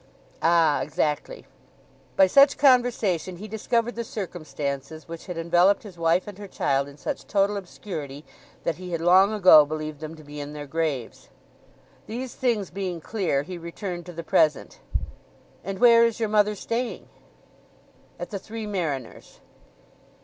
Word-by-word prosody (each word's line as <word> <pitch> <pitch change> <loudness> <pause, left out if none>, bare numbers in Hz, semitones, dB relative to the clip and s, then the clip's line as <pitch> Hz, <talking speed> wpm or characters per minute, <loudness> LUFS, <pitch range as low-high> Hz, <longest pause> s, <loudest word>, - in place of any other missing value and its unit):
"Ah; 165 -3 +3
exactly." 155 - -2 0.7
By 190 - +7
such 275 +9 +5
conversation 240 - +2
he 210 +4 -8
discovered 230 +2 -1
the 235 - -4
circumstances 155 - -5
which 165 +2 -9
had 180 -2 -5
enveloped 175 +4 +3
his 200 -5 -11
wife 170 +2 +2
and 205 -1 -10
her 205 - -8
child 140 -6 0
in 140 0 -13
such - - -5
total 200 0 +2
obscurity 160 -7 -7 0.4
that 165 - -1
he 180 -1 -7
had 165 - -1
long 185 +4 +5
ago 185 -7 +8
believed 155 0 -5
them 155 +1 -7
to 155 - -14
be 145 0 -9
in 145 +1 -6
their 150 -1 -7
graves. 145 -5 -3 0.8
These 245 +3 -5
things 230 -6 -1
being 185 -3 -4
clear, 165 -6 -1
he 180 +2 -7
returned 175 +1 -6
to 175 - -8
the 170 0 -6
present. 155 -2 +1 0.8
"And 195 0 -4
where 235 0 +7
is 230 -1 +1
your 220 -2 0
mother 210 0 +3
staying?" 230 +4 -4 1.1
"At - - -7
the 200 - -3
Three 220 +2 -7
Mariners." 160 - -4
180 Hz, 155 wpm, -25 LUFS, 155-210 Hz, 1.1 s, ago